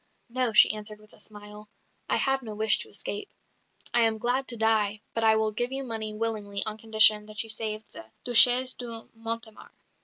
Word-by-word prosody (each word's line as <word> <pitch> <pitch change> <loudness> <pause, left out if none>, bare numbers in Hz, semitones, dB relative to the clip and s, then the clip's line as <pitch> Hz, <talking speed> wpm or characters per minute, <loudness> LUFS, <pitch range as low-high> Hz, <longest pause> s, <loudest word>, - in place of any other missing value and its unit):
"No," 250 -1 0
she 215 - +6
answered 210 0 -8
with 215 0 -21
a - - -13
smile, 210 0 -10 0.4
"I - - +2
have 270 0 +1
no 220 -4 -9
wish 215 0 +4
to - - -4
escape. 205 0 -6 0.6
I 240 - +3
am 225 -1 +3
glad 250 +4 -2
to 240 - -1
die; 215 -2 0
but 225 - -2
I 220 0 +4
will 220 0 0
give 240 +4 -3
you 270 0 -4
money 220 -3 -5
willingly 215 -2 -3
on 215 0 -6
condition 215 -1 +4
that 215 +1 -6
you 225 - -7
save 215 -1 -5
the 110 - -11 0.2
Duchesse 245 +1 +6
de 230 -2 -7
Mortemart." 225 -1 -9
220 Hz, 195 wpm, -26 LUFS, 215-230 Hz, 0.6 s, she